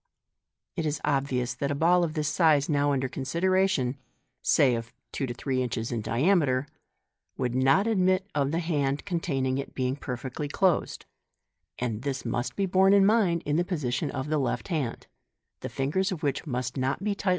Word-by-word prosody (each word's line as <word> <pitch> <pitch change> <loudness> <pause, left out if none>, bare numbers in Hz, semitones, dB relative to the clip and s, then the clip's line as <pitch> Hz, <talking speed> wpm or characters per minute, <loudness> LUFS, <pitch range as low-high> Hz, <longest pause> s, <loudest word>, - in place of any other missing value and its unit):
It 165 -3 -1
is 150 0 -2
obvious 135 -4 0
that 140 +2 -3
a 145 - -1
ball 175 +4 +4
of 160 -1 -2
the 155 - 0
size 150 -2 +3
now 145 -1 +2
under 130 -2 0
consideration 145 0 0 0.4
(say 130 -4 +4
of 115 0 -4 0.2
two 135 - -2
to 120 - -4
three 130 +1 -1
inches 115 -2 -3
in 115 -2 -2
diameter) 135 - +2 0.7
would 125 -2 -1
not 135 +9 +3
admit 185 -3 +2
of 140 -2 +1
the 165 - -1
hand 145 -4 -1
con 180 -4 -1
taining 135 -5 -1
it 140 - -7
being 130 0 0
perfectly 130 +2 -5
closed 180 +3 0 0.4
} 75 +2 -56
and 115 -3 -3
this 135 -1 -3
must 120 +2 -2
be 200 - 0
borne 190 +1 +4
in 200 -1 +6
mind 195 -6 +3
in 145 +1 +1
the 175 - +3
position 150 -6 -2
of 135 0 -4
the 155 -1 +1
left 135 +6 -2
hand, 145 -9 -2 0.5
the - - -5
fingers 170 +9 -1
of 175 -3 -5
which 145 +2 -1
must 125 -1 -3
not 135 +7 -1
be 210 0 +1
tight! 200 -1 -2
140 Hz, 190 wpm, -27 LUFS, 130-170 Hz, 0.7 s, in